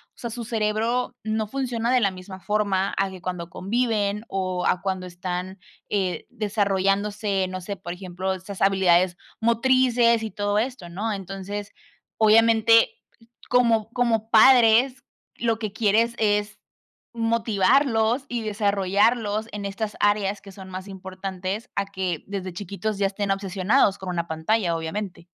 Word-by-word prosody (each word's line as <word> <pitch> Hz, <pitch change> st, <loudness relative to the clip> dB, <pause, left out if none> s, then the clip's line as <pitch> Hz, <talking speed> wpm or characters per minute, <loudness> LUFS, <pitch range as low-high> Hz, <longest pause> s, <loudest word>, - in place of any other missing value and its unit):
o -, -, -24 dB
sea, 235 Hz, -, -4 dB
su 235 Hz, +1 st, -6 dB
cerebro 225 Hz, +3 st, 0 dB
no 220 Hz, 0 st, -1 dB
funciona 240 Hz, -1 st, -2 dB
de 255 Hz, -, +4 dB
la 200 Hz, -3 st, +2 dB
misma 185 Hz, +1 st, -10 dB
forma 200 Hz, -1 st, 0 dB
a 195 Hz, 0 st, +1 dB
que 185 Hz, -1 st, -11 dB
cuando 180 Hz, -2 st, -4 dB
conviven 210 Hz, +1 st, -1 dB
o 185 Hz, -2 st, -2 dB
a 180 Hz, -, +1 dB
cuando 190 Hz, -2 st, -2 dB
están, 180 Hz, +1 st, -5 dB, 0.3 s
eh, 190 Hz, -3 st, -1 dB
desarrollándose, 200 Hz, -2 st, 0 dB
no 185 Hz, 0 st, -6 dB
sé, 200 Hz, +3 st, -5 dB
por 175 Hz, -, -7 dB
ejemplo, 185 Hz, +1 st, -4 dB
esas 190 Hz, +1 st, -9 dB
habilidades 185 Hz, -2 st, +3 dB, 0.2 s
motrices 235 Hz, 0 st, +3 dB
y 220 Hz, -, -3 dB
todo 205 Hz, +1 st, 0 dB
esto, 235 Hz, -6 st, -4 dB
¿no? 205 Hz, +6 st, -3 dB
Entonces, 195 Hz, +1 st, -6 dB, 0.5 s
obviamente, 225 Hz, -, +5 dB, 0.6 s
como 230 Hz, -3 st, +3 dB
como 225 Hz, -3 st, +1 dB
padres, 240 Hz, +2 st, +6 dB, 0.3 s
lo 230 Hz, -2 st, 0 dB
que 215 Hz, -3 st, -4 dB
quieres 225 Hz, +2 st, +2 dB
es 210 Hz, -1 st, 0 dB, 0.5 s
motivarlos 230 Hz, +2 st, +2 dB
y 240 Hz, -2 st, -3 dB
desarrollarlos 205 Hz, +1 st, +1 dB
en 205 Hz, -1 st, -5 dB
estas 205 Hz, +1 st, -4 dB
áreas 205 Hz, -1 st, +2 dB
que 195 Hz, -, -12 dB
son 190 Hz, 0 st, -11 dB
más 185 Hz, +1 st, -7 dB
importantes 190 Hz, +1 st, -5 dB
a 200 Hz, -, 0 dB
que 185 Hz, -5 st, -3 dB
desde 190 Hz, -2 st, -5 dB
chiquitos 200 Hz, +3 st, -4 dB
ya 200 Hz, -, +3 dB
estén 200 Hz, 0 st, -2 dB
obsesionados 195 Hz, +2 st, +2 dB
con 190 Hz, -, -7 dB
una 170 Hz, -1 st, -2 dB
pantalla, 170 Hz, +3 st, 0 dB
obviamente. 170 Hz, +1 st, -5 dB
205 Hz, 145 wpm, -24 LUFS, 190-225 Hz, 0.6 s, padres